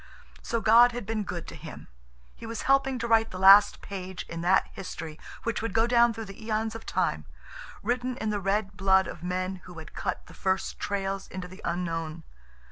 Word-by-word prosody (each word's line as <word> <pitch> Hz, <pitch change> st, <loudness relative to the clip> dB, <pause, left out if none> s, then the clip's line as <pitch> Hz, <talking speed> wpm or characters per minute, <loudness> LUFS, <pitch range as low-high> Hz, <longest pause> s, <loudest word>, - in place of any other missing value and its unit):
So 230 Hz, -1 st, -2 dB
God 235 Hz, +3 st, +7 dB
had 245 Hz, -3 st, -5 dB
been 215 Hz, 0 st, -2 dB
good 175 Hz, -3 st, -5 dB
to -, -, -9 dB
him. -, -, -10 dB, 0.5 s
He -, -, -9 dB
was 230 Hz, -1 st, -5 dB
helping 270 Hz, -1 st, +3 dB
to 235 Hz, -1 st, -3 dB
write 225 Hz, -1 st, +4 dB
the 185 Hz, -, -7 dB
last 195 Hz, +2 st, +7 dB
page 185 Hz, -2 st, -6 dB
in 170 Hz, 0 st, -5 dB
that 185 Hz, +2 st, +4 dB
history 165 Hz, -4 st, -7 dB, 0.2 s
which 230 Hz, -1 st, -1 dB
would 225 Hz, -4 st, -4 dB
go 225 Hz, 0 st, +4 dB
down 235 Hz, 0 st, +5 dB
through 225 Hz, 0 st, -6 dB
the 195 Hz, +3 st, -11 dB
eons 220 Hz, 0 st, -1 dB
of 225 Hz, 0 st, -9 dB
time, -, -, 0 dB, 0.6 s
written 250 Hz, +1 st, -1 dB
in 220 Hz, -4 st, -2 dB
the 205 Hz, -, -1 dB
red 195 Hz, +1 st, 0 dB
blood 190 Hz, 0 st, +4 dB
of 160 Hz, -, -8 dB
men 185 Hz, +1 st, -2 dB
who 180 Hz, -2 st, -11 dB
had 160 Hz, 0 st, -10 dB
cut -, -, -3 dB
the -, -, -14 dB
first 190 Hz, 0 st, -1 dB
trails 195 Hz, -1 st, -2 dB
into 185 Hz, -1 st, -6 dB
the 185 Hz, +2 st, -13 dB
unknown. 165 Hz, -2 st, -3 dB
200 Hz, 205 wpm, -28 LUFS, 185-225 Hz, 0.6 s, God